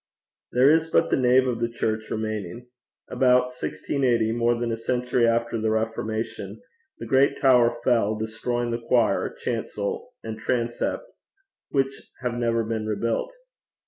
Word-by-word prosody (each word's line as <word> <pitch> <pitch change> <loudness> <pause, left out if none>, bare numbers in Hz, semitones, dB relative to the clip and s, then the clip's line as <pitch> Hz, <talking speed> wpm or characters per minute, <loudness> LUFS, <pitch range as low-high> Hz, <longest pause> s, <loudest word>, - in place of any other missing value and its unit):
There 125 +2 +4
is 160 +2 +4
but - - +2
the - - +4
nave 130 0 +4
of 120 -3 -1
the 115 0 0
church 110 -1 -2
remaining. 110 +1 -4 0.4
About 125 -1 +3
1680, 125 -3 0
more 120 0 +1
than 120 -1 -1
a - - 0
century 120 +1 0
after 115 -1 0
the 110 - +1
Reformation, 110 0 -3 0.4
the - - -7
great 135 +1 +3
tower 120 -3 +4
fell, 115 -4 +2
destroying 120 +2 -2
the 115 0 -3
choir, 115 0 +2
chancel, - - -4
and 110 -1 -6
transept, 120 - -1 0.7
which 135 -1 -1 0.2
have 125 -1 -1
never 115 -1 0
been 110 -1 -3
rebuilt. 115 - -1
120 Hz, 145 wpm, -25 LUFS, 110-125 Hz, 0.7 s, There